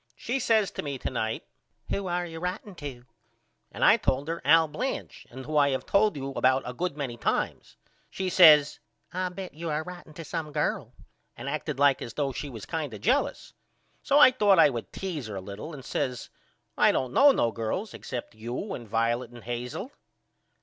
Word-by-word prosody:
She 255 +3 -2
says 220 -5 +2
to - - -4
me 140 -2 -4
to - - -4
night 110 -2 -2 0.5
Who 200 -1 -1
are 175 0 -1
you 165 -1 -7
writeing 180 +3 -4
to 135 -6 -8 0.7
and - - 0
I - - +7
told 140 +4 -1
her 165 +1 -3
Al 160 +3 +6
Blanch 250 - -5
and 130 +1 -9
who 155 0 -1
I 140 -1 +5
have 130 -1 -2
told 205 -4 +3
you 135 0 -4
about 130 0 +2
a 125 - -5
good 175 +1 -3
many 130 -5 -4
times. - - -2 0.3
She 190 - -3
says 155 -5 +7 0.3
I 185 0 -1
bet 185 +1 -8
you 165 +2 -5
are 155 +1 -1
writeing 175 -3 -11
to 165 - -8
some 155 0 -4
girl 150 0 -1 0.5
and 120 - -7
acted 150 0 -3
like 140 -1 +4
as 115 - -7
though 140 -2 0
she 145 +3 -5
was 115 -6 -8
kind 155 -8 -4
of 100 - -11
jealous. 275 - 0 0.5
So 285 - +2
I 295 -3 +9
thought 205 -6 +4
I 160 -3 +7
would 120 -3 -6
tease 165 - -5
her 105 - -6
a - - -3
little 100 - -8
and 140 -4 -9
I - - -16
says 130 -5 -3 0.4
I - - +5
don't 130 -1 -2
know 285 - +7
no 120 - +1
girls 115 - -3
except 125 -2 -6
you 120 - -5
and 120 - -7
Violet 115 +2 0
and 120 -1 -13
Hazel. 125 - -5
150 Hz, 205 wpm, -27 LUFS, 125-180 Hz, 0.7 s, I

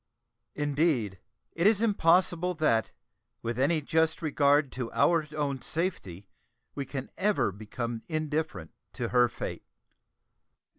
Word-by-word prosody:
Indeed, 145 - 0 0.3
it 170 +4 +2
is 215 -2 +4
impossible 180 -4 +3
that, 115 -9 +1 0.5
with 115 +1 -3
any 155 +4 +2
just 160 +2 +1
regard 145 -3 +2
to 125 -2 -5
our 165 -3 +3
own 140 -3 -2
safety, 100 - -3 0.5
we 140 -2 -4
can 135 -1 -6
ever 205 - +2
become 115 +3 -5
indifferent 155 - -3 0.2
to - - -3
her 125 -1 +4
fate. - - -6
145 Hz, 115 wpm, -29 LUFS, 125-165 Hz, 0.5 s, is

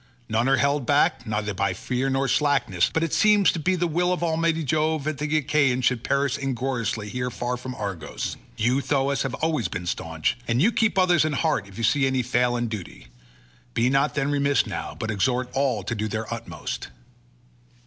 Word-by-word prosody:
None 115 +4 +1
are 135 - +4
held 140 -2 +1
back 145 -5 +2
neither 105 -1 -2
by 100 0 0
fear 130 +6 -2
nor 135 +1 +1
slackness, 135 - +2
but 160 - 0
it 165 - -2
seems 210 -2 +5
to 170 - -4
be 185 +4 +1
the 175 0 0
will 175 +2 +1
of 180 -1 -1
almighty 165 0 +1
Jove 155 +1 0
that 155 -1 -3
the 150 +1 0
Achaeans 140 -4 +2
should 125 -2 +1
perish 140 0 0
ingloriously 125 -5 -2
here 125 +4 -3
far 120 0 -3
from 125 +1 -7
Argos: 100 -8 -4 0.2
you, 125 +5 +2
Thoas, 140 0 0
have 135 -2 -2
been - - -7
always 155 - 0
staunch, 80 +2 -2
and 115 +1 +1
you 200 - +4
keep 220 -3 +1
others 180 -4 +4
in 155 -1 0
heart 145 - 0
if 100 - -14
you 115 - -4
see 135 +4 +3
any 130 -1 0
fail 120 +1 +1
in 120 0 -1
duty; 85 - -8 0.7
be 120 +2 +2
not 135 +2 +2
then 140 -1 0
remiss 140 -3 +2
now, - - -5
but 110 - -3
exhort 125 +4 0
all 135 -6 0
to 120 - -3
do 110 -1 -2
their 110 +1 -4
utmost." 100 -9 -6
135 Hz, 200 wpm, -24 LUFS, 115-150 Hz, 0.7 s, seems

